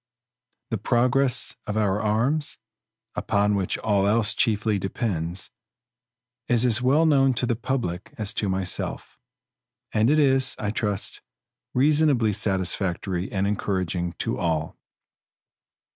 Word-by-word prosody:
The 115 Hz, -, -1 dB
progress 125 Hz, +3 st, +2 dB
of 105 Hz, -, -2 dB
our 105 Hz, -1 st, +1 dB
arms, 120 Hz, +8 st, 0 dB, 0.6 s
upon 105 Hz, 0 st, +1 dB
which 95 Hz, -3 st, -1 dB
all 100 Hz, -2 st, +1 dB
else 110 Hz, 0 st, +3 dB
chiefly 110 Hz, -2 st, +1 dB
depends, 90 Hz, -3 st, -3 dB, 1.0 s
is 120 Hz, 0 st, +3 dB
as 120 Hz, 0 st, +3 dB
well 140 Hz, +6 st, +3 dB
known 135 Hz, -4 st, +3 dB
to 120 Hz, -, +1 dB
the 120 Hz, -1 st, 0 dB
public 115 Hz, -7 st, -3 dB
as 105 Hz, -3 st, -1 dB
to 100 Hz, -, -1 dB
myself; 95 Hz, -1 st, -3 dB, 0.7 s
and 110 Hz, +2 st, +2 dB
it 150 Hz, -, +3 dB
is, 135 Hz, -3 st, +3 dB
I 105 Hz, -1 st, -2 dB
trust, 105 Hz, -2 st, -2 dB, 0.5 s
reasonably 140 Hz, -5 st, +3 dB
satisfactory 95 Hz, -2 st, -1 dB
and 95 Hz, 0 st, 0 dB
encouraging 95 Hz, -4 st, -2 dB
to -, -, -3 dB
all. 80 Hz, -3 st, -1 dB
105 Hz, 120 wpm, -24 LUFS, 95-125 Hz, 1.0 s, else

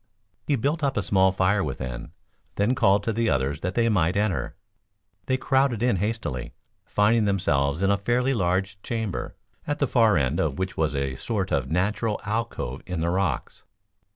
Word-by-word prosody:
He 145 Hz, -, +3 dB
built 145 Hz, +6 st, -1 dB
up 135 Hz, -3 st, 0 dB
a 100 Hz, -, +1 dB
small 95 Hz, -1 st, +3 dB
fire 95 Hz, +1 st, +2 dB
within, 65 Hz, -4 st, -5 dB, 0.4 s
then 105 Hz, +5 st, +2 dB
called 100 Hz, -4 st, +3 dB
to 115 Hz, -, -1 dB
the 115 Hz, +1 st, +1 dB
others 70 Hz, +3 st, 0 dB
that 90 Hz, +2 st, -3 dB
they 115 Hz, -1 st, +3 dB
might 95 Hz, -5 st, +2 dB
enter. 95 Hz, -, -1 dB, 0.7 s
They 130 Hz, -, +2 dB
crowded 130 Hz, -4 st, +1 dB
in 120 Hz, -5 st, +2 dB
hastily, 105 Hz, -, -3 dB, 0.3 s
finding 105 Hz, +2 st, +3 dB
themselves 75 Hz, -5 st, +1 dB
in 95 Hz, -, +3 dB
a 100 Hz, -, +3 dB
fairly 125 Hz, +5 st, +1 dB
large 95 Hz, -1 st, -1 dB
chamber, 110 Hz, -4 st, -4 dB, 0.3 s
at 145 Hz, 0 st, -1 dB
the 145 Hz, -, +2 dB
far 115 Hz, -6 st, +4 dB
end 70 Hz, +3 st, 0 dB
of 75 Hz, -4 st, 0 dB
which 95 Hz, 0 st, -3 dB
was 80 Hz, -2 st, 0 dB
a 70 Hz, -1 st, -1 dB
sort 100 Hz, -, -2 dB
of 65 Hz, -2 st, 0 dB
natural 105 Hz, +6 st, 0 dB
alcove 105 Hz, -, -3 dB
in 90 Hz, -3 st, -3 dB
the 85 Hz, +1 st, 0 dB
rocks. 90 Hz, -8 st, -2 dB
100 Hz, 180 wpm, -25 LUFS, 80-115 Hz, 0.7 s, far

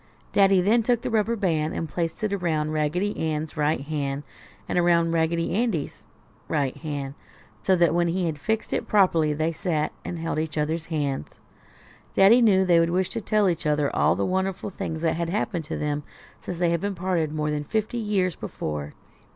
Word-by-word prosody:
Daddy 195 Hz, -2 st, +5 dB
then 220 Hz, +6 st, +3 dB
took 240 Hz, +1 st, +1 dB
the -, -, -2 dB
rubber 225 Hz, +1 st, +2 dB
band 160 Hz, -7 st, 0 dB
and 165 Hz, -, -2 dB
placed 165 Hz, +4 st, -3 dB
it 210 Hz, -2 st, 0 dB
around 160 Hz, -5 st, 0 dB
Raggedy 155 Hz, +7 st, 0 dB
Ann's 155 Hz, 0 st, -2 dB
right 150 Hz, -1 st, +1 dB
hand, 145 Hz, -1 st, -3 dB, 0.4 s
and -, -, +1 dB
around 170 Hz, -1 st, +3 dB
Raggedy 165 Hz, 0 st, 0 dB
Andy's 210 Hz, -9 st, -2 dB, 0.4 s
right 140 Hz, -4 st, 0 dB
hand, 145 Hz, -3 st, -5 dB, 0.5 s
so 190 Hz, -, +3 dB
that 170 Hz, -2 st, +3 dB
when 175 Hz, 0 st, +2 dB
he 175 Hz, +2 st, 0 dB
had 165 Hz, -, 0 dB
it 145 Hz, -, -15 dB
fixed 220 Hz, +5 st, -1 dB
properly 170 Hz, -7 st, +3 dB
they 155 Hz, +2 st, 0 dB
sat 155 Hz, -2 st, -1 dB
and 175 Hz, -, -5 dB
held 165 Hz, -1 st, -2 dB
each 155 Hz, -1 st, -3 dB
other's 155 Hz, +2 st, -1 dB
hands. 145 Hz, -, -3 dB, 0.8 s
Daddy 215 Hz, +6 st, +7 dB
knew 190 Hz, -5 st, +5 dB
they 175 Hz, -2 st, +5 dB
would 165 Hz, 0 st, +3 dB
wish 180 Hz, +1 st, +1 dB
to 230 Hz, -, -3 dB
tell 210 Hz, 0 st, +2 dB
each 170 Hz, -4 st, -1 dB
other 150 Hz, -1 st, +1 dB
all -, -, +3 dB
the 100 Hz, -, 0 dB
wonderful 190 Hz, +1 st, -1 dB
things 160 Hz, -3 st, -4 dB
that 165 Hz, -1 st, +1 dB
had 170 Hz, -1 st, -2 dB
happened 175 Hz, -3 st, -2 dB
to -, -, -4 dB
them 150 Hz, 0 st, -1 dB, 0.4 s
since 180 Hz, -, -5 dB
they 175 Hz, -1 st, +2 dB
had 195 Hz, +4 st, -1 dB
parted 175 Hz, -4 st, 0 dB
more 150 Hz, 0 st, -1 dB
than 150 Hz, 0 st, -2 dB
fifty 220 Hz, +8 st, -2 dB
years 195 Hz, -6 st, 0 dB
before. 75 Hz, -1 st, -5 dB
165 Hz, 190 wpm, -25 LUFS, 155-190 Hz, 0.8 s, Daddy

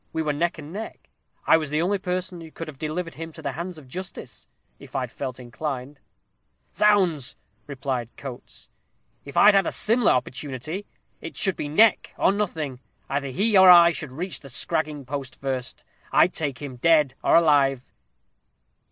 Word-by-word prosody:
We 160 Hz, 0 st, -1 dB
were 150 Hz, -1 st, 0 dB
neck 170 Hz, +4 st, -1 dB
and 155 Hz, +1 st, -9 dB
neck. 220 Hz, +3 st, -8 dB, 0.3 s
I -, -, +6 dB
was 155 Hz, -3 st, -3 dB
the 150 Hz, +1 st, 0 dB
only 190 Hz, +4 st, +1 dB
person 180 Hz, -2 st, -4 dB
who 165 Hz, -, -10 dB
could 165 Hz, +1 st, -8 dB
have 145 Hz, -3 st, -10 dB
delivered 165 Hz, +2 st, -3 dB
him 165 Hz, +1 st, -7 dB
to -, -, -10 dB
the 140 Hz, -, -2 dB
hands 170 Hz, +4 st, -6 dB
of 145 Hz, -4 st, -13 dB
justice, 130 Hz, -, -8 dB, 0.3 s
if -, -, -14 dB
I'd -, -, -2 dB
felt 130 Hz, -2 st, -6 dB
inclined." 130 Hz, +2 st, -6 dB, 0.7 s
"Zounds!" 185 Hz, -10 st, +2 dB, 0.5 s
cried 125 Hz, -4 st, -2 dB
Coates; 130 Hz, -3 st, -9 dB, 0.6 s
"If 140 Hz, -, -8 dB
I 210 Hz, -, +8 dB
had 195 Hz, -1 st, +3 dB
a -, -, -1 dB
similar 230 Hz, +2 st, +2 dB
opportunity, 140 Hz, +8 st, -4 dB, 0.3 s
it -, -, -8 dB
should 195 Hz, -3 st, +1 dB
be -, -, -4 dB
neck 215 Hz, +8 st, +3 dB
or -, -, +3 dB
nothing. 160 Hz, -10 st, -3 dB, 0.3 s
Either 140 Hz, 0 st, -1 dB
he 200 Hz, -, +1 dB
or 190 Hz, -1 st, +8 dB
I 170 Hz, -1 st, +9 dB
should 150 Hz, -5 st, -5 dB
reach 175 Hz, +7 st, -4 dB
the 140 Hz, -, -12 dB
scragging 150 Hz, +2 st, -2 dB
post 135 Hz, -2 st, -6 dB
first. 130 Hz, -2 st, -4 dB, 0.3 s
I'd 180 Hz, -, +4 dB
take 145 Hz, -4 st, -3 dB
him, 130 Hz, -3 st, -7 dB
dead 150 Hz, -1 st, +3 dB
or -, -, +4 dB
alive." 140 Hz, -5 st, +3 dB
155 Hz, 175 wpm, -24 LUFS, 135-180 Hz, 0.7 s, I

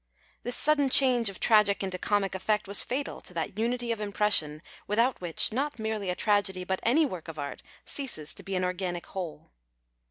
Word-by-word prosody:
This 245 Hz, -, -1 dB
sudden 290 Hz, -2 st, +2 dB
change 250 Hz, -4 st, +4 dB
of 195 Hz, -, -7 dB
tragic 210 Hz, -3 st, +3 dB
into 185 Hz, -1 st, -3 dB
comic 205 Hz, -1 st, 0 dB
effect 205 Hz, +2 st, -1 dB
was 200 Hz, 0 st, +4 dB
fatal 275 Hz, +3 st, -4 dB
to 180 Hz, -, -9 dB
that 165 Hz, -2 st, -3 dB
iniity 235 Hz, +3 st, -1 dB
of 220 Hz, -, -7 dB
impression 200 Hz, -7 st, +3 dB, 0.2 s
without 230 Hz, +4 st, +1 dB
which 175 Hz, +4 st, +1 dB
not 285 Hz, +3 st, -2 dB
merely 220 Hz, -3 st, -3 dB
a 180 Hz, -, -1 dB
tragedy 200 Hz, -3 st, +1 dB
but 190 Hz, +1 st, -2 dB
any 290 Hz, +8 st, +3 dB
work 185 Hz, -, -6 dB
of 160 Hz, -1 st, -8 dB
art 145 Hz, -1 st, -6 dB, 0.2 s
ceases 215 Hz, -, -1 dB
to -, -, -11 dB
be 195 Hz, -1 st, -5 dB
an 185 Hz, -, 0 dB
organic 180 Hz, -1 st, -3 dB
whole. 175 Hz, -, -7 dB
205 Hz, 190 wpm, -28 LUFS, 185-235 Hz, 0.2 s, change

